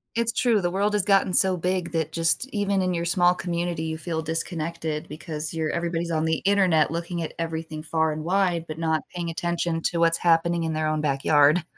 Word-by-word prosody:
It's 230 0 +1
true, 235 -3 +2
the 175 -2 -1
world 200 +3 0
has 205 -2 +1
gotten 195 -2 +2
so 190 0 +8
big 180 -1 -2
that 160 -2 -2
just 165 +8 +4
even 200 -4 -1
in 185 -1 -1
your 170 0 -2
small 175 +1 +4
community, 175 -2 -3
you 160 0 -4
feel 160 0 -2
disconnected 160 0 -3
because 155 0 -5
your 160 -1 -2
everybody's 170 0 -3
on 155 0 0
the 160 0 0
Internet 185 -7 +2
looking 170 +1 -4
at 160 - -6
everything 160 -1 -5
far 160 0 0
and 155 0 -6
wide 180 -2 0
but 155 - -7
not 160 -1 -1
paying 170 -1 -4
attention 170 0 -2
to 170 - 0
what's 165 0 +4
happening 170 0 +1
in 160 -1 -2
their 155 0 -1
own 155 0 -1
backyard. 145 +3 +2
165 Hz, 210 wpm, -24 LUFS, 160-180 Hz, -, so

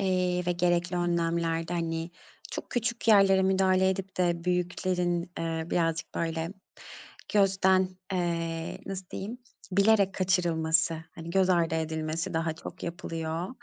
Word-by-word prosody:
eee, 180 -2 +1
ve 175 - +2
gerekli 175 0 +1
önlemlerde, 170 -1 0
hani, 165 0 -2 0.4
çok - - -6
küçük 235 -1 -2
yerlere 195 -3 +6
müdahale 190 0 +3
edip 190 0 -4
de 175 -2 +1
büyüklerin, 180 0 0
eee, 165 -1 -2
birazcık, 165 -1 0
böyle, 165 0 -1 0.9
gözden, 190 -2 +4 0.2
eee, 165 -2 -2
nasıl 190 -1 -5
diyeyim, 220 +6 -5 0.3
bilerek 200 0 +4
kaçırılması, 165 -3 +1 0.2
hani, 165 0 -7
göz 190 0 +3
ardı 170 -2 +2
edilmesi 160 +2 -2
daha 165 0 0
çok 165 - -10
yapılıyor. 165 0 -4
175 Hz, 125 wpm, -28 LUFS, 165-190 Hz, 0.9 s, yerlere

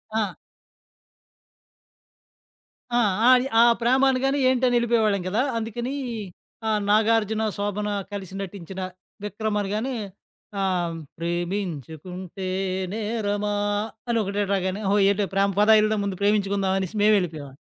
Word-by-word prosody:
ఆ! 210 -4 -1 2.6
ఆ! - - +4 0.3
అయి 255 0 +5
ఆ - - +8 0.2
ప్రేమ 250 +3 +3
అనగానే 270 +2 +1
ఏంటని 255 -1 +2
యెళ్లిపోయేవాళ్లం 225 -4 +2
కదా! 205 +5 0 0.2
అందుకని 230 +3 -3 0.8
ఆహ్, 215 -1 +2
నాగార్జున, 220 0 +3
శోభన 205 +1 -2 0.2
కలిసి 195 -2 -6
నటించిన 190 -1 -7 0.4
'విక్రమ్' 210 +1 -2
అనగానే 215 +6 -2 0.7
ఆహ్, 180 -3 0 0.2
ప్రేమించుకుంటే 175 - -4 0.5
నేరమా 210 -1 -1 0.5
అని 235 -1 +1
ఒకటే 200 +1 -1
రాగానే, 190 +1 -1
"ఓహో! 205 - +3
ఏటో 200 0 +1
ప్రేమ. 195 +1 +3
పదా 210 +1 +6
యెల్దం, 215 0 +2
ముందు 195 -2 -3
ప్రేమించుకుందాం" 200 -2 +1
అనేసి 190 +1 -4
మేమెళ్లిపోయేవాళ్లం. 165 -10 +1
205 Hz, 110 wpm, -24 LUFS, 190-220 Hz, 2.6 s, ఆ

